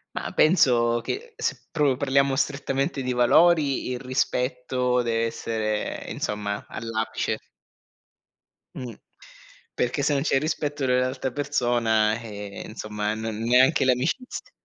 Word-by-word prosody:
Ma - - -3
penso 120 -8 +4
che 465 - -5
se - - -3
proprio 145 -4 +2
parliamo 140 0 +2
strettamente 140 -1 -1
di 125 -1 -1
valori, 140 +3 +4
il 125 - -3
rispetto 125 -1 0
deve 115 -1 0
essere, 110 -2 -3
insomma, 105 -1 -3
all'apice. 110 -1 -2 1.4
Mh, 125 -3 -6 0.8
perché 125 +4 -1
se 150 - +2
non 140 - +1
c'è 135 -3 +2
rispetto 150 -2 -2
dell'altra 130 +1 0
persona, 120 -6 +1
eh, 105 -3 -7
insomma, 105 -1 -3
non 110 -1 -4
neanche 130 +5 +4
l'amicizia 160 - -1
125 Hz, 115 wpm, -25 LUFS, 115-140 Hz, 1.4 s, penso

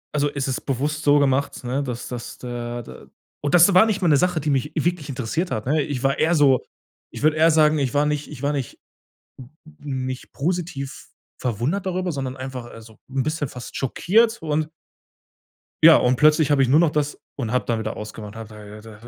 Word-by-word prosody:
Also, 145 0 +2
es 140 -2 -3
ist 130 - -2
bewusst 145 +4 -1
so 145 0 +5
gemacht, 140 -1 +1
ne, 125 +3 -1
dass 125 -3 -5
dass 120 -1 -7
da 120 -1 -5
da - - -13 0.3
und 145 +3 +1
das 175 +3 +7
war 185 +5 +6
nicht 205 -2 -1
mal - - +3
'ne 145 - +5
Sache, 180 +1 +1
die 150 0 -1
mich 140 +3 0
wirklich 160 -1 -1
interessiert 135 +7 -2
hat, 110 -5 -3
ne? 150 +3 +2
Ich 140 -4 -4
war 135 +2 +1
eher 165 +2 +3
so 135 -4 +4 0.5
ich - - -9
würde 155 0 +4
eher 160 +1 +5
sagen, 155 -1 +4
ich 135 -1 -1
war 145 - +3
nicht 150 0 -2
ich 145 -3 -10
war 145 +1 +1
nicht 135 -4 -5 1.0
nicht 130 -3 -5
positiv 160 -4 -4 0.3
verwundert 125 - -2
darüber, 185 -1 -1
sondern 135 -2 -4
einfach, 130 -2 -6
also, 115 -1 -13
'n 135 0 0
bisschen 155 -3 -2
fast 125 -1 -9
schockiert. 220 - +2
Und 155 0 -1 1.1
ja, - - +9
und 125 +1 +2
plötzlich 155 +1 +4
habe 145 -2 +3
ich 125 - 0
nur 150 +4 +5
noch 170 -3 +3
das 150 -1 -2 0.2
und 115 -5 -3
habe 125 - 0
dann 115 - 0
wieder 110 - -4
ausgemacht. 105 0 -8
Und - - -7
habe 110 - -8 0.3
da 110 +1 -13
140 Hz, 210 wpm, -22 LUFS, 125-155 Hz, 1.1 s, ja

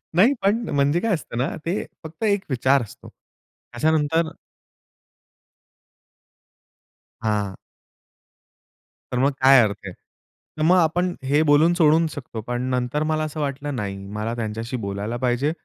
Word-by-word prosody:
नाही 225 +10 +5
पण 215 +4 +1
म्हणजे 145 +3 +2
काय 225 0 0
असतं 145 -7 -4
ना, 125 - 0 0.2
ते 180 +5 -1 0.2
फक्त 160 +7 -9
एक 200 -2 +2
विचार 130 +1 +2
असतो. 105 - -13 0.6
त्याच्यानंतर 160 +4 +1 2.9
हां. 105 -3 -1 1.6
तर 125 - -1
मग 140 +2 +3
काय 135 -1 +8
अर्थ 105 -3 0
आहे. 95 - -6 0.6
तर - - -4
मग 175 +3 +5
आपण 175 +2 +2
हे 145 +3 +2
बोलून 155 +3 +4
सोडू 165 -1 +4
शकतो. 125 -6 -7
पण 120 +2 -3
नंतर 125 +4 -1
मला 155 0 0
असं 155 0 -5
वाटलं 145 0 -3
नाही, 100 -4 -4
मला 105 +3 -4
त्यांच्याशी 115 +2 -4
बोलायला 100 +4 -3
पाहिजे 130 +4 0
140 Hz, 135 wpm, -23 LUFS, 120-160 Hz, 2.9 s, काय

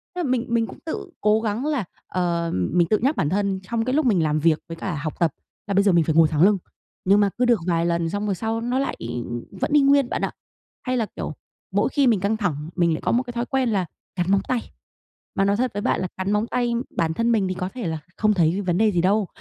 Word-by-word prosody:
tức - - -4
là 270 - -1
mình 250 -1 +1
mình 230 -1 +1
cũng - - -11
tự 320 - -5
cố 215 +1 +3
gắng 225 +4 -2
là, 290 -9 0 0.2
ờ, 170 -2 -1
mình 165 - +1
tự 215 - +4
nhắc 275 +6 +1
bản 145 - +1
thân 195 0 0
trong 225 +3 -2
cái 255 - 0
lúc 310 -2 +2
mình 190 -9 +3
làm 155 0 +1
việc 160 0 +3
với 165 - -5
cả 175 -4 -3
học 155 - -4
tập 165 -4 +3 0.4
là 200 - -1
bây 200 +1 +4
giờ 200 - +4
mình 170 -2 +4
phải 160 - 0
ngồi 165 -1 +7
thẳng 155 -2 0
lưng, 200 0 +5 0.5
nhưng 200 +2 +5
mà 205 -1 +4
cứ 250 - +2
được 235 -5 +4
vài 170 -1 +2
lần 170 -1 0
xong 205 +3 -2
rồi 195 - 0
sau 225 +3 -2
nó 250 +3 0
lại 275 - -1
y 120 +1 -4 0.3
vẫn 195 +8 -3
y 295 - +6
nguyên 275 -2 +4
bạn - - -2
ạ. - - -1 0.5
Hay 255 -1 -1
là, 225 - +1
kiểu, - - -4 0.4
mỗi - - +2
khi 280 -3 +2
mình 220 -4 +4
căng 205 +3 0
thẳng, 155 -7 -2
mình 170 -2 +2
lại - - -3
có - - 0
một 245 +2 +2
cái 245 -1 -8
thói 240 0 -1
quen 265 -2 0
là 195 -4 +1 0.3
cắn 180 +1 0
móng 200 - +4
tay. 250 -3 -2 0.6
Mà 195 - +2
nói 200 +1 +2
thật 250 -1 0
với 205 - -3
bạn - - 0
là 185 - -1
cắn 190 +2 -1
móng 210 +2 +1
tay 240 -1 0 0.2
bản 165 -1 +1
thân 230 +5 +1
mình 210 -4 +2
thì 185 - -1
có 180 0 -3
thể 245 -9 -4
là 160 - -2 0.2
không 215 -1 +3
thấy 175 +2 +2
c 185 - -10
vấn 175 0 +2
đề 220 0 +4
gì 175 -3 +1
đâu, 200 +1 +2
200 Hz, 285 wpm, -23 LUFS, 175-235 Hz, 0.6 s, ngồi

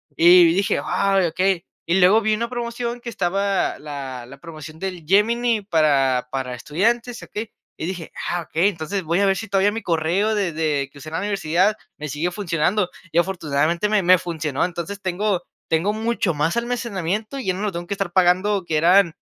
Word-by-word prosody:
Y 175 0 +7
dije: 195 +2 +1
"Ay, 195 -2 +2
okey". 185 +1 0 0.2
Y 175 +3 +2
luego 190 +5 +6
vi 215 0 +1
una 235 +2 -1
promoción 240 0 -4
que 240 - -6
estaba 195 -1 0
la 135 -4 -7
la 135 +3 -12
promoción 155 -1 -10
del 180 -3 -5
Gemini 225 +5 +2
para 140 -8 +2
para 130 -2 -3
estudiantes, 230 - -1
¿okey? 215 +1 -6 0.3
Y - - -4
dije: 175 -2 -5 0.2
"Ah, 175 -1 -1
okey". 165 +5 +1
Entonces, 185 +1 -4
voy 170 +3 0
a 200 - +3
ver 195 -1 +3
si 225 +1 -6
todavía 195 +1 +3
mi 225 - -4
correo 175 +5 +1
de 195 -6 0
de 150 -4 -1
que 140 - -14
usé 155 - -9
en - - -12
la 165 - -1
universidad 195 0 +1 0.2
me 150 - -5
sigue 150 +5 -2
funcionando. 180 0 0 0.2
Y - - -2
afortunadamente 170 0 +1
me 210 -1 +3
me 185 0 +6
funcionó. 160 -5 -2
Entonces, 180 +3 -4
tengo 185 0 -1 0.2
tengo 165 +5 +1
mucho 220 -4 -1
más 150 +5 0
almacenamiento 225 -1 -2
y 265 - -5
ya 185 - +2
no 185 - -5
lo 210 -2 -1
tengo 170 0 -5
que 200 - -2
estar 195 -3 -3
pagando 185 +2 +3
que 155 -2 0
eran 175 +1 +5
180 Hz, 195 wpm, -22 LUFS, 160-205 Hz, 0.3 s, Y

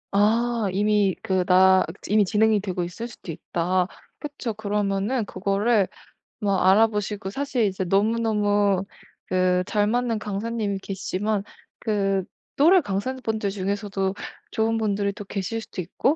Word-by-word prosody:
아. 225 +2 +2
이미 205 -1 +2
그 185 -1 +1
나 190 +1 +6
그 165 - -7 0.2
이미 210 +1 +5
진행이 215 +2 +3
되고 185 -3 -2
있을 180 +7 -5
수도 215 -7 -9
있다. 175 +3 -1 0.3
그쵸. 285 -6 -5
그러면은 205 +2 -1
그거를 200 +2 +1 0.5
뭐 200 -3 +1
알아보시고 210 +1 +2
사실 260 +1 -1
이제 190 -1 -1
너무너무 205 -1 +2 0.4
그 185 0 +2
잘 205 +1 +1
맞는 235 0 0
강사님이 210 0 -2
계시지만 195 +2 -2 0.4
그 195 -3 0 0.3
또래 345 +6 +6
강사분들 220 -1 -2
중에서도 195 0 -2 0.4
좋은 225 +1 +1
분들이 205 -2 0
또 205 - -8
계실 195 +3 -3
수도 190 - -6
있고 225 - 0
205 Hz, 285 characters per minute, -24 LUFS, 195-220 Hz, 0.5 s, 나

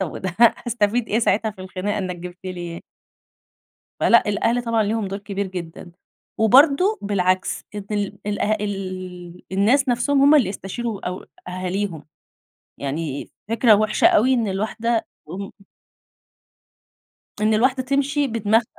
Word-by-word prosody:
طيب 190 0 -4
هأستفيد 235 -1 +2
إيه 215 - +1
ساعتها 220 -1 +1
في 200 -3 -14
الخناقة 190 +2 -3
إنك 185 -2 -3
جبت 180 +1 -9
لي 175 -2 -5
ي - - -11 1.2
فلأ، 235 - +5
الأهل 230 +4 +1
طبعًا 230 -2 +1
ليهم 215 0 -1
دور 195 +1 -5
كبير 200 0 -4
جدًا، 175 -1 -8 0.5
وبرضه 280 - +5
بالعكس 185 -2 0
إن 205 - -5
ال 205 -1 -2
الأه 210 +1 0
ال 185 -3 -6
الناس 240 +8 +3
نفسهم 260 +4 +2
هُم 285 +2 +7
اللي 245 -10 +4
يستشيروا 205 +2 -5
أو 180 +1 -6 0.2
أهاليهم، 185 -2 -3 0.7
يعني 140 0 -4 0.2
فكرة 230 0 +5
وحشة 215 +1 +3
أوي 255 +5 +4
إن 230 -4 0
الواحدة 220 +3 -1 0.2
م 190 +5 -6 1.9
إن 215 +1 +3
الواحدة 255 +4 +2
تمشي 280 +1 0
بدماغها. 225 -1 +2
205 Hz, 130 wpm, -22 LUFS, 185-235 Hz, 1.9 s, هُم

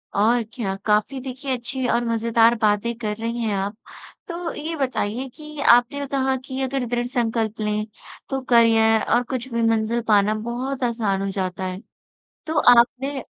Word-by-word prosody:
और 230 +4 +3
क्या। 195 -6 -3
काफ़ी 215 +6 +1
देखिए 265 +1 -5
अच्छी 255 +2 -4
और 240 +1 +1
मज़ेदार 230 0 +3
बातें 215 +2 +2
कर 210 -2 -2
रही 230 +1 -3
हैं 215 -2 0
आप, 195 +2 -2 0.5
तो 340 -1 -4
ये 315 +2 -4
बताइए 260 -3 -2
कि 305 -1 -10
आपने 245 +2 +4
अ, 285 - -3
कहा 265 -1 0
कि 265 0 -5
अगर 265 -1 -1
दृढ़ 240 0 -1
संकल्प 225 -3 -1
लें, 210 0 -1 0.4
तो 270 -1 -2
करियर 225 -2 +5
और 240 +1 +3
कुछ 255 0 -4
भी 235 - 0
मंज़िल 225 +1 +1
पाना 210 -1 +4 0.2
बहुत 260 +2 -3
आसान 225 -5 0
हो 195 - -2
जाता 190 -1 -3
है। 185 +2 -5 0.7
तो 320 -1 -1 0.2
आपने 265 +3 +1
235 Hz, 170 wpm, -22 LUFS, 220-265 Hz, 0.7 s, करियर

